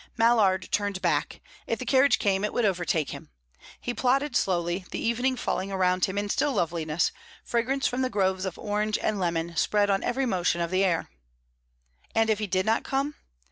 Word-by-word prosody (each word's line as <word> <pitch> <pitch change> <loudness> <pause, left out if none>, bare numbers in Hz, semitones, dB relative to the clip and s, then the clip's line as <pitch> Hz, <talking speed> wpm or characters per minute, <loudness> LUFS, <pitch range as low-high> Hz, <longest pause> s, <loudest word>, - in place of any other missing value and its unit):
Mallard 220 -5 +3
turned 205 -2 0
back; - - -1 0.3
if - - -1
the - - -6
carriage 265 -1 +4
came, 195 -2 +1
it 210 - 0
would 240 - +1
overtake 175 -6 0
him. - - -9 0.5
He 245 - -3
plodded 260 +3 +1
slowly, 175 -2 0
the - - -4
evening 250 +3 0
falling 195 -4 -2
around 185 -1 +2
him 190 +1 -5
in 205 0 -1
still 285 +7 +1
loveliness, 165 -4 0 0.3
fragrance 260 +4 0
from 250 +1 0
the 255 - +1
groves 190 -4 0
of 190 - -4
orange 210 0 -1
and 215 -2 -1
lemon 170 -1 -1
spread 205 +4 +2
on 195 - +1
every 260 +2 0
motion 180 -6 0
of 170 0 -2
the 185 +1 +2
air. 175 -4 0 1.0
And 225 0 +3
if 215 - 0
he 210 - -2
did 185 0 0
not 225 +1 +1
come? 275 +2 -1
205 Hz, 190 wpm, -27 LUFS, 185-235 Hz, 1.0 s, carriage